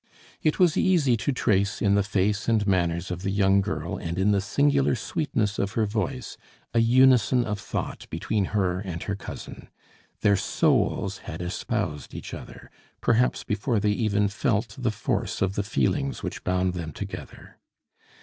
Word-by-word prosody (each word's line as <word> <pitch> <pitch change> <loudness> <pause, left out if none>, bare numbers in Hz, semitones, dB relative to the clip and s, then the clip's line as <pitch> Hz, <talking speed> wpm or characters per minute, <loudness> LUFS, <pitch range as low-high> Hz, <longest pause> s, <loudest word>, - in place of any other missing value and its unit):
It 155 - +1
was 175 -4 +4
easy 160 -10 +3
to 140 - -1
trace 100 -5 +1
in 100 -1 +3
the 100 - +4
face 105 +2 0
and 110 -2 +2
manners 85 -3 0
of 90 0 -4
the 100 - -2
young 100 0 +3
girl 85 -5 -3
and 85 -1 -4
in 95 +2 +3
the 100 -1 +2
singular 140 +6 +2
sweetness 115 -5 -1
of 100 0 -1
her 110 - +1
voice 110 +3 -3 0.4
a 115 - +3
unison 125 0 +5
of 105 -1 -3
thought - - -5
between 100 +5 -1
her 95 -3 0
and 90 -3 -5
her 100 - -2
cousin. 100 - -9 0.5
Their 100 -1 +4
souls 100 - +1
had 80 - -6
espoused 90 - -3
each - - -7
other, - - -10 0.3
perhaps 120 +2 +2
before 105 +2 0
they 105 0 +2
even 105 -1 +1
felt 105 +3 -1
the 125 -3 -1
force 110 - -2
of 95 0 +1
the 100 - 0
feelings 135 +7 -1
which 90 - -5
bound 90 0 +1
them 80 -4 -5
together. - - -8
105 Hz, 170 wpm, -26 LUFS, 95-120 Hz, 0.5 s, unison